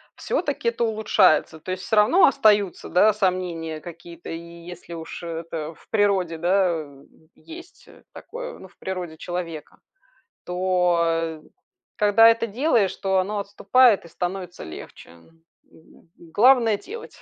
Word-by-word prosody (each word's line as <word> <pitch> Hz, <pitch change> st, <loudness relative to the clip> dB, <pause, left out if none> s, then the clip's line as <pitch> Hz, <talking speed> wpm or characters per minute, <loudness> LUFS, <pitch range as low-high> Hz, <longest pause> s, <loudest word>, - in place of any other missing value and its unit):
всё-таки 290 Hz, -, -2 dB
это 235 Hz, 0 st, -3 dB
улучшается. 215 Hz, -8 st, +2 dB
То 185 Hz, -, -7 dB
есть 185 Hz, 0 st, -5 dB
всё 220 Hz, -, -1 dB
равно 215 Hz, -, +5 dB
остаются, 210 Hz, -7 st, +2 dB
да, 210 Hz, +4 st, +4 dB
сомнения 180 Hz, -5 st, -2 dB
какие-то. 170 Hz, 0 st, -11 dB
И 165 Hz, -, -5 dB
если 170 Hz, +1 st, -11 dB
уж 165 Hz, +1 st, -8 dB
это 165 Hz, -1 st, -6 dB
в -, -, -23 dB
природе, 195 Hz, -6 st, +1 dB
да, 185 Hz, +3 st, +2 dB
э, 140 Hz, -2 st, -14 dB, 0.3 s
есть 345 Hz, +2 st, -14 dB, 0.3 s
такое. -, -, -8 dB
Ну, 190 Hz, -, -12 dB
в -, -, -28 dB
природе 180 Hz, -4 st, -6 dB
человека, 170 Hz, -2 st, -6 dB, 0.7 s
то, 180 Hz, -1 st, +1 dB
э, 165 Hz, -1 st, -2 dB, 0.6 s
когда 210 Hz, +2 st, +5 dB
это 230 Hz, 0 st, +1 dB
делаешь, 230 Hz, -3 st, +1 dB
то 190 Hz, -1 st, +1 dB
оно 205 Hz, +3 st, -2 dB
отступает 205 Hz, +2 st, +3 dB
и -, -, -11 dB
становится 180 Hz, +1 st, -5 dB
легче. 80 Hz, +2 st, -11 dB, 0.4 s
Г 160 Hz, -, -22 dB, 0.2 s
главное- 225 Hz, +6 st, +3 dB
делать, 450 Hz, -, -11 dB
185 Hz, 135 wpm, -23 LUFS, 170-215 Hz, 0.7 s, равно